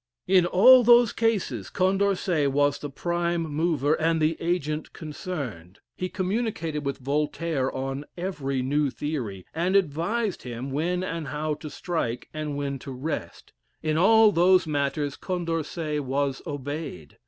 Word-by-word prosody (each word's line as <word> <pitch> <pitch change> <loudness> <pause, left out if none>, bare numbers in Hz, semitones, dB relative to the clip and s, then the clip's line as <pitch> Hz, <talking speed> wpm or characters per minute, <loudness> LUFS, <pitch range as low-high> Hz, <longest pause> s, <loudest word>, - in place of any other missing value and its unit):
In 180 -2 +4
all 245 +8 +7
those 240 -1 +6
cases 200 - 0
Condorcet 185 -5 +1
was 145 +1 +2
the 145 - -5
prime 170 +3 -1
mover 155 -2 +1
and 160 +1 +1
the 155 +1 +2
agent 160 -3 -2
concerned. 140 - -6 0.2
He 185 - -3
communicated 185 -6 -2
with 140 -1 -2
Voltaire 145 +1 -1
on 135 +2 -4
every 140 -8 -2
new 145 +2 +1
theory, 125 - -4
and 175 +4 0
advised 195 +5 0
him 125 +2 -6
when 175 +6 -1
and 165 -4 -4
how 150 +1 -2
to 150 +1 -7
strike, 145 -9 -3
and 155 -2 -3
when 140 -1 -3
to 135 - -8
rest. 135 +5 -5 0.3
In 155 -1 0
all 220 +5 +6
those 180 0 +4
matters 145 -1 -1
Condorcet 165 -4 -2
was 135 0 -1
obeyed. 145 - -6
155 Hz, 140 wpm, -26 LUFS, 140-180 Hz, 0.3 s, all